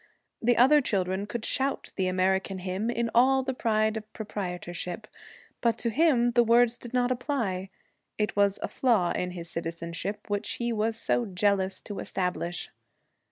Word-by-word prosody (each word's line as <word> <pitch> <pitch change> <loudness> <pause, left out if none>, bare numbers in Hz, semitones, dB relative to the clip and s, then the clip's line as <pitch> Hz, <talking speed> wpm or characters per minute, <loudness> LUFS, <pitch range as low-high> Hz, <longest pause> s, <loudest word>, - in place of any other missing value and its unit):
The 240 +1 +3
other 290 +5 +6
children 190 -3 -1
could 220 +1 -4
shout 270 +1 -1
the 190 -1 0
American 190 +1 +1
hymn 185 +4 -2
in 235 -1 -1
all 265 +3 +5
the 265 0 -2
pride 220 -3 +1
of 220 0 -7
proprietorship, 180 -1 -5 0.6
but 235 -2 +2
to 235 - -1
him 255 -4 +3
the 240 0 +4
words 235 +1 +4
did 240 - -8
not 250 0 +1
apply. 235 -8 -2 0.5
It 210 -1 -1
was 200 -1 +3
a - - 0
flaw 225 -9 +2
in 180 - -1
his 170 -2 -6
citizenship, 170 +4 -4
which 205 +1 -2
he 235 -1 -2
was 220 +1 0
so 235 0 0
jealous 190 0 0
to 205 -2 -6
establish. 180 -1 -2
215 Hz, 160 wpm, -28 LUFS, 185-240 Hz, 0.6 s, other